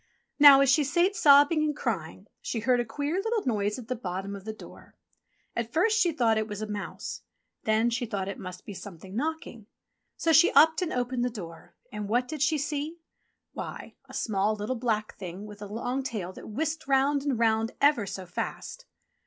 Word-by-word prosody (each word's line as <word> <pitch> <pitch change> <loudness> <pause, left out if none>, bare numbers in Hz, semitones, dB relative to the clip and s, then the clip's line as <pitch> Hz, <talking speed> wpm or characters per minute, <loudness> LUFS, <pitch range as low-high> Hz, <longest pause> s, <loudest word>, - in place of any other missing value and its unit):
Now 285 -2 +10
as 275 -1 +4
she 295 +2 +4
sate 345 +8 +2
sobbing 290 +1 +6
and 300 -1 0
crying 190 - -3 0.2
she 225 - -3
heard 245 +2 +2
a 240 - 0
queer 290 +9 -2
little 450 0 -1
noise 210 -4 0
at 245 -3 -9
the 255 - -2
bottom 195 -2 -5
of 195 0 -10
the 220 - -3
door. 215 - -14 0.6
At 235 -1 -3
first 435 +8 +2
she 350 -6 +3
thought 230 -7 +2
it 215 - -2
was 205 -2 -6
a 215 - -3
mouse. 210 -1 -6 0.4
Then 220 +2 +2
she 240 0 -2
thought 200 -3 -3
it 195 - -5
must 185 -1 -8
be 205 - -7
something 190 0 -10
knocking. 285 -6 -4 0.5
So 330 - +2
she 320 +3 +6
upped 320 +3 +6
and 355 - -1
opened 245 0 -1
the 250 - +1
door 170 -8 -10 0.2
and 210 -1 -5
what 245 +3 +1
did 305 -1 -6
she 310 +1 +3
see.? 295 +3 -3 0.6
Why! - - -7 0.2
a - - -12
small, 210 0 0
little, 215 +5 -3
black 225 -3 -1
Thing 185 +2 -7
with 210 -1 -11
a 205 - -6
long 245 +5 -3
tail 210 -8 -4
that - - -11
whisked 310 +6 -3
round 275 +1 +3
and 275 -3 -1
round 225 0 +1
ever 280 -8 +3
so 190 -1 -6
fast. 175 - -6
235 Hz, 200 wpm, -28 LUFS, 210-290 Hz, 0.6 s, Now